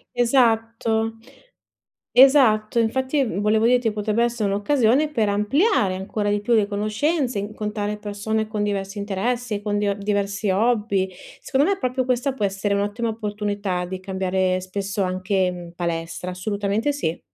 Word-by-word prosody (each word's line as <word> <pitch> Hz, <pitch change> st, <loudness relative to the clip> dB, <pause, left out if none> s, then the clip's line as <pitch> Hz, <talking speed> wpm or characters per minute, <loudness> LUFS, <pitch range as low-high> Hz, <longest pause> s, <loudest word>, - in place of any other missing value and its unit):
Esatto, 225 Hz, -2 st, +1 dB, 1.0 s
esatto! 240 Hz, -4 st, +5 dB
Infatti 260 Hz, +5 st, +1 dB
v 210 Hz, -7 st, -3 dB
volevo 215 Hz, +2 st, +3 dB
dirti 245 Hz, -1 st, +3 dB
che -, -, -1 dB
potrebbe 210 Hz, +2 st, 0 dB
essere 235 Hz, -3 st, -1 dB
un'occasione 250 Hz, +7 st, +2 dB
per 225 Hz, -7 st, +1 dB
ampliare 210 Hz, -, +2 dB
ancora 205 Hz, +2 st, -2 dB
di 205 Hz, 0 st, +1 dB
più 235 Hz, +3 st, +1 dB
le 215 Hz, -3 st, +3 dB
conoscenze, 215 Hz, +6 st, -1 dB
incontrare 210 Hz, 0 st, -3 dB
persone 210 Hz, +1 st, -2 dB
con 215 Hz, -1 st, -3 dB
diversi 200 Hz, 0 st, -2 dB
interessi, 210 Hz, +2 st, -2 dB
con 205 Hz, 0 st, -1 dB
dive 200 Hz, -1 st, 0 dB
diversi 200 Hz, 0 st, -1 dB
hobby. 205 Hz, -2 st, +1 dB, 0.3 s
Secondo 275 Hz, +3 st, +1 dB
me 390 Hz, -, -2 dB
proprio 255 Hz, -4 st, -1 dB
questa 255 Hz, +2 st, 0 dB
può 215 Hz, -, -2 dB
essere 200 Hz, +1 st, 0 dB
un'ottima 205 Hz, +4 st, -1 dB
opportunità 205 Hz, -4 st, -2 dB
di 185 Hz, +1 st, -5 dB
cambiare 190 Hz, -1 st, 0 dB
spesso 195 Hz, +2 st, -3 dB
anche, 185 Hz, 0 st, 0 dB
mhmm, 175 Hz, -1 st, -9 dB
palestra, 170 Hz, +1 st, -3 dB
assolutamente 205 Hz, +6 st, -1 dB
sì. 170 Hz, -, -3 dB
210 Hz, 145 wpm, -23 LUFS, 200-235 Hz, 1.0 s, esatto